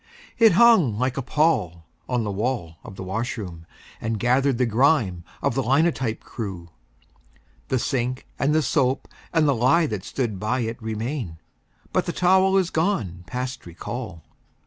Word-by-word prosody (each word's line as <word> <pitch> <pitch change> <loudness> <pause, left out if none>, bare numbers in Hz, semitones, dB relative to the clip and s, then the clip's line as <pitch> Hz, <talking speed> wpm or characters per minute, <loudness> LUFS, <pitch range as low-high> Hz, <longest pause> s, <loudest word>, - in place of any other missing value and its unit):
It 225 -4 +7
hung 185 - +5
like 130 +2 0
a 135 - -2
pall 125 - 0 0.2
on 125 -2 0
the 105 - -2
wall 100 -6 -2
of 100 - -10
the 95 - -7
washroom, 95 -4 -4 0.3
And 115 -1 -2
gathered 130 +3 +2
the 125 - +2
grime 115 - +2 0.2
of - - +1
the 135 - 0
linotype 135 -3 +1
crew. 95 -7 -7 1.0
The 130 - +1
sink 125 +1 -2
and 150 +2 +2
the 155 - +3
soap 135 -3 +1 0.2
and 160 -3 +3
the 140 - +4
lye 130 +8 +3
that 105 -10 -4
stood 115 -8 -3
by 125 +5 0
it 115 +1 -4
Remain; 110 - -4 0.6
but - - +1
the - - -2
towel 190 +1 +4
is 185 -2 +1
gone 115 - -1
past 125 -4 -5
recall. 90 0 -7
125 Hz, 160 wpm, -24 LUFS, 105-140 Hz, 1.0 s, It